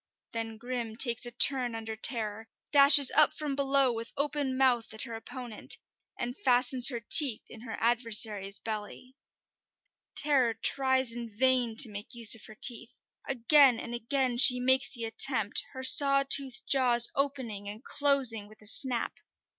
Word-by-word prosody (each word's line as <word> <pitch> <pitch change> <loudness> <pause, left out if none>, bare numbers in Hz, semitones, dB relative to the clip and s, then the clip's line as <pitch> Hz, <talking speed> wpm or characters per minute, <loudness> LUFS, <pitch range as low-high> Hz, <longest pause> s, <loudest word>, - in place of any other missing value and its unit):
Then 225 -1 -6
Grim 240 -1 -7
takes 235 -1 +2
a - - -9
turn 245 0 +2
under 225 0 -8
Terror, 220 -1 -1 0.2
dashes 280 -1 +7
up 305 -1 +2
from 295 -3 -6
below 275 -2 0
with 230 0 -9
open 285 -2 -3
mouth 250 -4 -1
at 220 - -3
her 235 - -9
opponent, 240 0 -8 0.4
and 245 +1 -6
fastens 250 -1 +3
her 240 -3 -7
teeth 250 +1 +1
in 220 - -14
her 225 -2 -9
adversary's 220 -4 +1
belly. 215 +4 -9 1.0
Terror 265 -6 +1
tries 260 +2 0
in 235 -1 -9
vain 245 +1 -1
to 235 - +4
make 210 +3 -11
use 230 -3 +2
of 225 - -4
her 215 - -16
teeth. 240 0 -3 0.3
Again 270 0 +2
and 240 - -9
again 245 +1 -4
she 250 0 +5
makes 260 +1 0
the 235 -3 -5
attempt, 225 -2 0
her 260 -1 -9
saw 275 +1 +6
toothed 270 -2 +1
jaws 245 -3 +3
opening 255 -8 -4
and 215 +4 -10
closing 270 -7 0
with 215 0 -21
a - - -7
snap. 245 +1 -2
245 Hz, 160 wpm, -27 LUFS, 225-265 Hz, 1.0 s, dashes